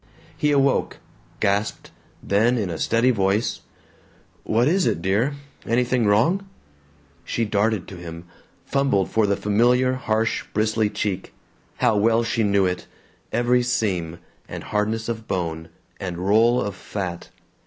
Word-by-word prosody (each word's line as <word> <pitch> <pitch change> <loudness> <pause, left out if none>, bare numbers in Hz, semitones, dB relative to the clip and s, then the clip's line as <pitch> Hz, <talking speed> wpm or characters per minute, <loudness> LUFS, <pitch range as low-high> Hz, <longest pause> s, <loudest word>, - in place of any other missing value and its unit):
He 150 - +1
awoke, 140 -1 +2 0.4
gasped, 100 +2 -1 0.3
then 115 +5 +2
in 100 -6 -2
a 80 - -5
steady 115 +3 +3
voice: 100 0 0 0.8
"What 115 +4 +2
is 185 +4 +2
it, - - 0
dear? 100 - +1 0.3
Anything 120 -1 +1
wrong?" 170 - +2 0.7
She 115 - -1
darted 105 -2 0
to 95 - -9
him, 85 0 -8 0.4
fumbled 135 -9 +1
for 110 -2 +2
the 100 - +1
familiar 125 +5 +3
harsh 115 -3 -1
bristly 110 0 +1
cheek. 95 -3 -3 0.4
How 120 -4 +2
well 115 +2 +3
she 115 0 -1
knew 100 -2 +3
it, 90 -1 -2 0.4
every 125 +1 +2
seam, 95 -9 -1 0.3
and - - -6
hardness 110 +2 -1
of 115 -1 -4
bone, 80 -3 -3 0.3
and 90 -3 -4
roll 110 +7 +3
of 100 0 -2
fat! 95 -4 -5
110 Hz, 135 wpm, -23 LUFS, 100-120 Hz, 0.8 s, steady